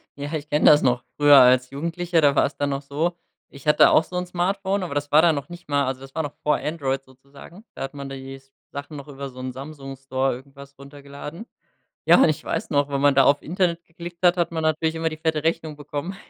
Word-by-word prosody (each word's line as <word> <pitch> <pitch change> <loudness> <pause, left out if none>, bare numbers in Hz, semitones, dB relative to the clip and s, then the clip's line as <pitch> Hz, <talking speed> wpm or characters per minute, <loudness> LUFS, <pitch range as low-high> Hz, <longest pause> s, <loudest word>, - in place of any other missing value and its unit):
Ja, 145 +2 -6
ich 150 -1 -4
kenne 150 - +1
das 150 - +7
noch. 125 -1 +1
Früher 145 -1 +7
als 125 0 +5
Jugendlicher, 170 +3 -1
da 140 -1 +4
war - - +4
es 140 - -5
dann 145 - -1
noch 135 +1 -3
so: 160 +5 -2 0.3
Ich 140 +1 -13
hatte 150 - +6
auch 160 - +5
so 180 - -11
'n 180 - -2
Smartphone, 190 +2 -1
aber 155 -5 -5
das 145 0 -3
war 150 +2 +7
dann 165 -3 +4
noch 140 +4 -6
nicht 175 -3 -12
mal 140 -1 +1
also 130 0 -4
das 135 0 -12
war 160 - -1
noch 145 - -6
vor 150 -1 +2
Android 135 -4 -3
sozusagen. 140 +8 -16
Da - - -9
hat 135 +1 -6
man 140 -1 -7
da 135 - -6
die 135 0 -9 0.3
Sachen 145 +2 -7
noch 140 +1 -10
über 140 -1 -7
so 130 - -13
'n 130 0 -4
Samsung-Store 135 -2 -4
irgendwas 140 +1 -14
runtergeladen. 140 - -10 0.6
Ja, - - +6
und - - +5
ich 155 - -2
weiß - - -3
noch, 145 -1 +1
wenn 140 -1 -2
man 145 -1 +4
da 135 - +6
auf 140 +1 +3
Internet 170 0 -1
geklickt 170 0 -10
hat, 180 0 +5
hat 170 -1 0
man 160 - -3
natürlich 160 +1 0
immer 160 0 -1
die 155 - -8
fette 160 -1 -1
Rechnung 160 -2 -1
bekommen. 150 +5 -5
145 Hz, 245 wpm, -23 LUFS, 140-165 Hz, 0.6 s, das